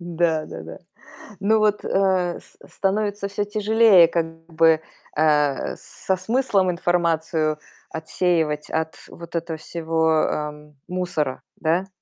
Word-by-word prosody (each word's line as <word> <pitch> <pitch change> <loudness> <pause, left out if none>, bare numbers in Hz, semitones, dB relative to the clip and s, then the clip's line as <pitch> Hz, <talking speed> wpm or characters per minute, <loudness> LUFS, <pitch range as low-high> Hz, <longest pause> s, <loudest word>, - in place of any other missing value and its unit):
Да-да-да. 160 - -2 0.6
Но 215 +2 +3
вот, 210 -1 +2
э, 185 -2 +1
с - - -22 0.2
становится 205 0 -1
всё 200 +1 -2
тяжелее 210 -3 +5
как 170 0 0 0.2
бы, 165 -1 +4 0.4
э, 150 -3 +2
со 190 - -3
смыслом 195 -1 +1
информацию 165 -3 0 0.3
отсеивать 160 -2 -1
от 160 0 -2
вот 170 0 -11
этого 165 -1 -3
всего, 160 -1 0
эм, 150 -1 -5
мусора, 175 -7 -2 0.2
да? 170 +4 +1
170 Hz, 110 wpm, -23 LUFS, 160-190 Hz, 0.6 s, тяжелее